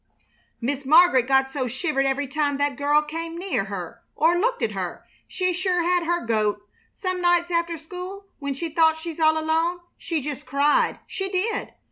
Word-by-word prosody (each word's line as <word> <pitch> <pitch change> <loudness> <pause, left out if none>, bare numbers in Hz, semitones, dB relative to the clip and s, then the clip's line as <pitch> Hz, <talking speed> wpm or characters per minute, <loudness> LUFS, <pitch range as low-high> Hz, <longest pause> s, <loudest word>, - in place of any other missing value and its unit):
Miss 270 +3 -2
Mar'get 290 -3 +5
got 265 0 +3
so 265 -2 -2
she 245 +2 -6
shivered 275 -4 +1
every 275 +1 0
time 285 0 0
that 285 -1 0
girl 290 +3 +3
came 330 +2 -5
near 355 - -1
her 195 +3 -7
or 330 +3 +3
looked 485 +4 0
at - - +1
her. - - -5 0.2
She 365 -1 -1
sure 360 0 0
had 355 0 +1
her 345 -4 0
goat! 215 -2 +1 0.3
Some 370 -1 -3
nights 350 0 +2
after 335 0 0
school, 365 +5 -8
when 280 -2 -3
she 330 +4 -4
thought 320 0 +3
she's 330 0 -7
all 315 0 +4
alone, 325 +3 0 0.2
she 330 -2 -2
just 285 -2 -6
cried, 280 +3 +2
she 385 0 -4
did. 385 +4 -2
315 Hz, 185 wpm, -24 LUFS, 275-350 Hz, 0.3 s, Mar'get